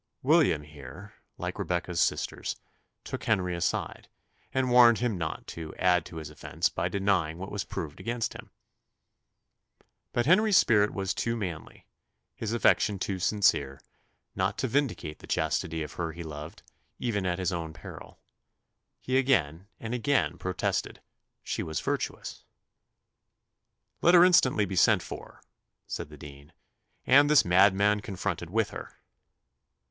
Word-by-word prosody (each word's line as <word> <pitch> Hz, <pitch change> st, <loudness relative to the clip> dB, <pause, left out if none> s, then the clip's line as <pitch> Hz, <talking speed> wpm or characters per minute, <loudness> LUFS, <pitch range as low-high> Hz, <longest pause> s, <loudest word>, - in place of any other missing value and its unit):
William 140 Hz, -, +3 dB
here, 75 Hz, +7 st, -12 dB, 0.2 s
like -, -, -5 dB
Rebecca's 90 Hz, -1 st, -2 dB
sisters, -, -, -1 dB, 0.5 s
took -, -, -6 dB
Henry 90 Hz, -1 st, +1 dB
aside, 85 Hz, -, -2 dB, 0.4 s
and 130 Hz, -1 st, 0 dB
warned 120 Hz, -2 st, +7 dB
him 120 Hz, -4 st, -1 dB
not 80 Hz, -3 st, -4 dB
to 80 Hz, -2 st, -7 dB
"add 90 Hz, -1 st, +2 dB
to -, -, -12 dB
his 80 Hz, -2 st, -7 dB
offence -, -, -2 dB
by 85 Hz, +2 st, -2 dB
denying 95 Hz, -5 st, 0 dB
what 95 Hz, +2 st, -7 dB
was 100 Hz, -1 st, -3 dB
proved 80 Hz, -5 st, -6 dB
against 115 Hz, +4 st, -2 dB
him." -, -, -11 dB, 1.6 s
But 120 Hz, -, 0 dB
Henry's 200 Hz, +5 st, +5 dB
spirit 105 Hz, -2 st, +4 dB
was 95 Hz, -1 st, -2 dB
too 115 Hz, 0 st, -1 dB
manly, 90 Hz, -7 st, -6 dB, 0.5 s
his 110 Hz, -, -4 dB
affection 115 Hz, -3 st, +3 dB
too 95 Hz, 0 st, -3 dB
sincere, 75 Hz, -9 st, +1 dB, 0.6 s
not -, -, -1 dB
to -, -, -1 dB
vindicate 115 Hz, -, -1 dB
the -, -, -13 dB
chastity 80 Hz, +1 st, -1 dB
of 75 Hz, -, -8 dB
her 85 Hz, -2 st, -4 dB
he 85 Hz, +1 st, -7 dB
loved, 75 Hz, 0 st, -9 dB, 0.3 s
even 105 Hz, -5 st, -2 dB
at 90 Hz, -1 st, -1 dB
his 95 Hz, 0 st, -1 dB
own 85 Hz, -2 st, -4 dB
peril. -, -, -11 dB, 0.8 s
He 130 Hz, +1 st, +1 dB
again 95 Hz, -, +1 dB
and 115 Hz, +1 st, -5 dB
again 125 Hz, -7 st, 0 dB
protested 95 Hz, -1 st, -2 dB, 0.4 s
"she -, -, -3 dB
was 80 Hz, -1 st, -3 dB
virtuous." -, -, -4 dB, 1.6 s
"Let 175 Hz, +1 st, +6 dB
her 175 Hz, 0 st, +8 dB
instantly 130 Hz, -, +4 dB
be 95 Hz, 0 st, -5 dB
sent 85 Hz, -, +4 dB
for," -, -, -10 dB, 0.4 s
said -, -, -5 dB
the 75 Hz, -, -12 dB
dean, 70 Hz, 0 st, -13 dB, 0.5 s
"and 145 Hz, +3 st, +6 dB
this 150 Hz, -2 st, +6 dB
madman 100 Hz, +3 st, +4 dB
confronted 95 Hz, -4 st, -4 dB
with 110 Hz, +3 st, 0 dB
her." -, -, -9 dB
95 Hz, 140 wpm, -28 LUFS, 80-115 Hz, 1.6 s, her